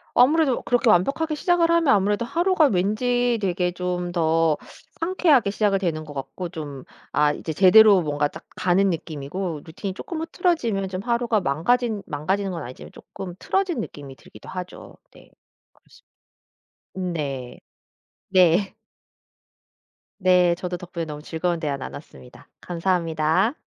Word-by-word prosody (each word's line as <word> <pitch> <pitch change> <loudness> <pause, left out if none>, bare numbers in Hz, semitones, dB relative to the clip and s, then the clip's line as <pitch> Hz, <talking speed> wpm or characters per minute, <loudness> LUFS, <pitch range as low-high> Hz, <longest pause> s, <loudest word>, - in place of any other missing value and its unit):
아무래도 275 +1 +4
그렇게 245 0 +1
완벽하게 275 - +2
시작을 335 +2 +2
하면 335 -2 +3
아무래도 205 +3 +1
하루가 345 +4 +2
왠지 240 +4 +1
되게 180 -2 0
좀 180 0 -3
더 165 -2 +2 0.4
상쾌하게 330 - +3
시작이 200 -1 +1
되는 165 -5 -2
것 150 -1 -10
같고 170 +6 -5
좀 145 -6 -7 0.3
아 150 +1 +3
이제 160 - -5
제대로 195 +4 +7
뭔가 145 -2 0
딱 - - -12
가는 190 +2 +2
느낌이고 160 +1 -4
루틴이 185 +4 -6
쪼끔 315 - -6
흐트러지면 315 - 0
좀 185 0 -4
하루가 235 -1 +1
망가진 205 - 0
망가지는 190 +7 -2
건 170 - -5
아니지만 125 +2 -10
쪼끔 180 -2 -9
틀어진 380 -8 -1
느낌이 140 -9 -8
들기도 110 - -15
하죠. 180 -1 -8 0.2
네. - - -18 0.4
그렇습 - - -24 0.9
음 180 -2 -2
네. 135 -6 -5 0.7
네. 185 +1 +3 1.5
네 180 -2 +4
저도 180 +1 -4
덕분에 175 -1 -6
너무 150 -1 -8
즐거운 170 +2 -2
대화 145 -3 -2
나눴습니다. 130 -2 -11
감사합니다. 170 - 0
185 Hz, 320 characters per minute, -23 LUFS, 160-235 Hz, 1.5 s, 제대로